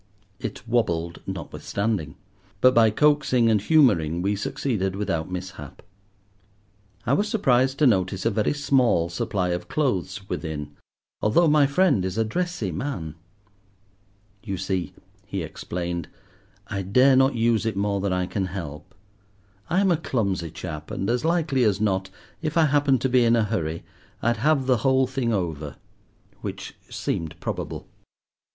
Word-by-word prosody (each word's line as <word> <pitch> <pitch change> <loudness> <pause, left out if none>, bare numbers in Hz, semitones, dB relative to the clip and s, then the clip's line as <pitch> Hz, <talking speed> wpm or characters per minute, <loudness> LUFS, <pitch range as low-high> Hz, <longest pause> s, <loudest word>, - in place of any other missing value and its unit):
It 110 0 -6
wobbled 85 -8 0
notwithstanding, 100 -8 -3 0.4
but 130 +3 +5
by 115 -2 +6
coaxing 135 -2 +3
and 105 -2 +3
humouring 95 - +3
we 100 +1 +1
succeeded 95 -2 -2
without 85 -5 -2
mishap. 90 -6 -7 1.2
I 125 - +2
was 205 +8 +1
surprised 135 - +2
to 150 - +3
notice 95 -4 +2
a 115 - +3
very 105 +1 +1
small 130 - +2
supply 90 +2 -1
of 90 0 -3
clothes 95 - -1
within, 75 -5 -4 0.5
although 160 +11 +4
my 150 -2 +5
friend 140 - +3
is 95 +2 -3
a 115 - +3
dressy 175 - -2
man. 85 - -4 1.3
"You 100 -4 -4
see," 95 -1 -3 0.3
he - - -3
explained, 85 -1 -4 0.6
"I 100 -1 -3
dare 125 +8 +4
not 135 0 +4
use 115 -1 +2
it 110 - -2
more 100 0 0
than 100 -1 -1
I 90 0 0
can 95 +1 -2
help. 75 -6 -7 0.7
I 185 +3 +2
am 195 -2 +3
a 170 - +3
clumsy 100 - -1
chap, 75 -2 -7
and 95 +4 -2
as 125 +3 0
likely 160 -6 +1
as 105 -3 +2
not, 95 -3 0 0.3
if 155 0 -2
I 165 - +6
happened 140 -3 +2
to 130 - +1
be 125 -1 +4
in 115 0 +4
a 115 - +3
hurry, 85 -7 -2 0.4
I'd 120 +1 +1
have 140 +3 +2
the 130 -1 +3
whole 130 +3 +3
thing 130 -2 -1
over:" 80 -8 -3 0.7
which - - -6 0.2
seemed 80 -1 -3
probable. - - -5
110 Hz, 150 wpm, -24 LUFS, 90-130 Hz, 1.3 s, by